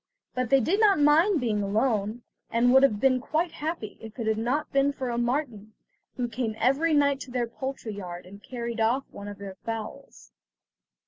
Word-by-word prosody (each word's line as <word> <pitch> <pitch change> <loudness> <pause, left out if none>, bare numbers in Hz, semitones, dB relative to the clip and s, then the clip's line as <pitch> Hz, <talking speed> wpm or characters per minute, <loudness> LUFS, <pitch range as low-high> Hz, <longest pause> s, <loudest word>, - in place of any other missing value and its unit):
But 255 -2 -1
they 275 - +5
did 345 - +1
not 410 -6 +5
mind 315 +5 +4
being 220 -5 0
alone, 215 +2 0 0.3
and 245 +2 +3
would 265 - +7
have 225 -7 +3
been 255 +1 +3
quite 320 +5 -1
happy, 305 -10 -5
if 220 +1 -10
it 230 - -3
had 220 0 +1
not 270 +7 -1
been 275 +1 +3
for 260 -3 -3
a 235 - -2
marten, 240 -4 -2 0.4
who 245 -1 -1
came 235 -2 -3
every 280 +7 +2
night 280 -1 +3
to 260 - -8
their 245 -1 -1
poultry 250 -1 -6
yard, 180 -3 -7
and 200 +2 -13
carried 235 -1 -5
off 240 +5 +2
one 200 - -9
of 205 -1 -7
their 195 -1 -8
fowls. 220 - -7
245 Hz, 195 wpm, -27 LUFS, 220-275 Hz, 0.4 s, would